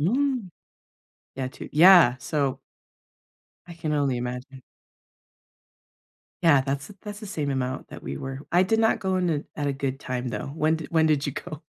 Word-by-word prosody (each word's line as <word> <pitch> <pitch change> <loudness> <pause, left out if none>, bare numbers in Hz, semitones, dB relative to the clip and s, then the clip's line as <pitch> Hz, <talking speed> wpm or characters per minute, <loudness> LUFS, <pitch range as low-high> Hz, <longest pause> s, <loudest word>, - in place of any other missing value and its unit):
Mm. 245 - 0 0.9
Yeah 130 -1 -2
to - - -10
Yeah. 170 -6 +8
So 140 -1 -1 1.1
I 170 - -8
can 155 -2 -3
only 140 -3 +1
imagine. 125 +2 -6 1.8
Yeah, 145 -5 +6
that's 140 +2 -3
th 200 - -14
that's 210 -1 -7
the 215 - -7
same 150 -8 -2
amount 130 -1 -3
that - - -10
we 70 - -5
were 135 0 -6
I 175 +2 +5
did 220 +4 +1
not 225 0 +3
go 190 -1 0
in 180 -2 +1
a 150 -2 -1 0.2
at 145 - 0
a 140 - +1
good 135 -1 -3
time, 125 -2 -4
though, - - -4
when 160 +1 +2
d 160 - -7
when 160 -1 +3
did 150 -2 +2
you 145 - -2
go? 155 +2 -7
150 Hz, 185 wpm, -25 LUFS, 135-180 Hz, 1.8 s, Yeah